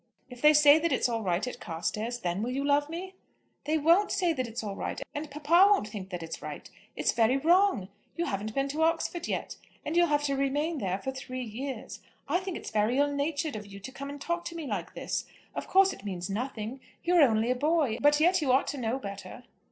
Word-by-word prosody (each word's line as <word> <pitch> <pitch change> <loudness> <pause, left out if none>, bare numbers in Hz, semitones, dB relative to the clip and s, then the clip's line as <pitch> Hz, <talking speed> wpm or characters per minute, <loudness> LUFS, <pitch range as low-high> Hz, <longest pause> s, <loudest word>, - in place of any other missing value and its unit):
"If 245 -1 -10
they 300 0 +7
say 295 +1 +7
that 335 +1 0
it's - - +2
all 230 -2 -2
right 185 +1 0
at 250 -1 -6
Carstairs, 215 +7 -3
then 175 +2 -1
will 235 - -2
you 270 +2 -2
love 290 +1 +2
me?" 365 +4 -6 0.5
"They 310 +1 +1
won't 335 +7 +4
say 360 -4 +1
that 255 -5 -2
it's 225 0 -5
all 200 -2 -4
right; - - -4
and 295 +1 -5
papa 305 +6 +5
won't 395 - +2
think 195 -3 -7
that 180 -3 -5
it's 165 - -7
right. - - -7 0.3
It's - - +1
very 230 +3 +3
wrong. 335 - +3 0.3
You 340 - 0
haven't 210 - -3
been 275 0 +1
to 300 +3 -2
Oxford 330 +1 0
yet, - - -3 0.3
and 310 - -2
you'll 345 0 +5
have 295 -1 +1
to 280 -1 0
remain 290 +4 0
there 190 -4 -1
for 265 +7 -4
three 255 -1 -6
years. 250 +4 -6 0.3
I 345 +5 +2
think 375 -1 -5
it's - - -8
very 220 +3 +1
ill 285 0 +2
natured 285 0 -1
of 210 -1 -7
you 200 0 -10
to 220 +7 -8
come 275 +1 -7
and 285 0 -7
talk 345 +3 -2
to 335 - -6
me 330 -2 -5
like - - -4
this. - - -3 0.3
Of - - -5
course 385 0 +5
it - - -13
means 185 -2 -4
nothing. 235 +2 -4 0.2
You 355 +1 +3
are - - +7
only 230 -3 +4
a - - +1
boy, 290 -4 +1
but 295 +1 +5
yet 355 +3 +4
you 275 -4 +2
ought 265 +2 +4
to 280 - -4
know 235 +1 -1
better." 200 -6 -8
275 Hz, 240 wpm, -29 LUFS, 220-315 Hz, 0.5 s, they